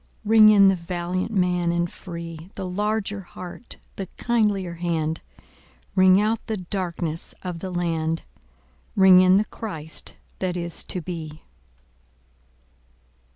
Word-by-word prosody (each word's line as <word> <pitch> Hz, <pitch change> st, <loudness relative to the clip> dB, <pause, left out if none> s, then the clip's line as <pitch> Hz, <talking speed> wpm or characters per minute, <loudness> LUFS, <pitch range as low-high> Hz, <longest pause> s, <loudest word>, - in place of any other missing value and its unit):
Ring 215 Hz, 0 st, +7 dB
in 200 Hz, -2 st, +7 dB
the 195 Hz, -, +5 dB
valiant 180 Hz, +2 st, -3 dB
man 180 Hz, -3 st, +1 dB
and 170 Hz, 0 st, +1 dB
free, 170 Hz, -1 st, -8 dB
The 195 Hz, -, -4 dB
larger 205 Hz, +1 st, -1 dB
heart, 180 Hz, +4 st, -9 dB, 0.2 s
the 195 Hz, -, -4 dB
kindlier 210 Hz, -7 st, +1 dB
hand; 165 Hz, -2 st, -2 dB, 0.7 s
Ring 185 Hz, 0 st, +6 dB
out 215 Hz, +2 st, 0 dB
the 220 Hz, -2 st, -2 dB
darkenss 175 Hz, -3 st, -3 dB
of 180 Hz, -2 st, -4 dB
the 190 Hz, -, -5 dB
land, 165 Hz, -2 st, -1 dB, 0.7 s
Ring 190 Hz, -2 st, +8 dB
in 185 Hz, +1 st, +6 dB
the 210 Hz, -, +2 dB
Christ 160 Hz, -9 st, -6 dB, 0.2 s
that 180 Hz, -1 st, -1 dB
is 170 Hz, -1 st, -2 dB
to 180 Hz, -, -4 dB
be. 160 Hz, -2 st, -7 dB
180 Hz, 125 wpm, -24 LUFS, 170-195 Hz, 0.7 s, Ring